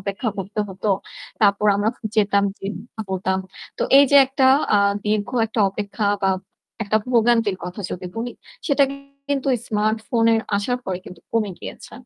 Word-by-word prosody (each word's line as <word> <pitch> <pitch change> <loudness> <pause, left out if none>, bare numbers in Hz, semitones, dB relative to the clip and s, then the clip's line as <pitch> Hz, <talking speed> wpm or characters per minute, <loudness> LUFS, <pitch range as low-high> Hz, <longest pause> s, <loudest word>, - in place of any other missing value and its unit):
অপেক্ষা 200 +3 -3
করতে 195 +3 -3
হত। 190 +2 -12 0.6
তারপর 205 0 +3
আমরা 205 +2 +1 0.3
যেতাম, 200 -1 +3
যেয়ে 195 +2 -5 0.4
বলতাম। 190 0 0 0.4
তো - - 0 0.2
এই 280 - +8
যে 285 - +6
একটা 265 0 +2 0.3
আ - - +6 0.3
দীর্ঘ 210 -1 0 0.2
একটা 220 0 -2
অপেক্ষা 205 +1 -3 0.2
বা 190 - +3 0.5
একটা 215 +1 +1
ভোগান্তির 230 -4 +3
কথা 180 +3 -6
যদি 180 0 -5
বলি 235 +1 -3 0.3
সেটা 280 -2 +4 0.4
কিন্তু 275 -1 0 0.2
smartphone-এর 220 +1 +1 0.2
আসার 245 +5 -1
পরে 185 -1 -3
কিন্তু 180 -2 -11
কমে 220 -3 +1
গিয়েছে। - - -9
210 Hz, 150 wpm, -22 LUFS, 200-230 Hz, 0.6 s, এই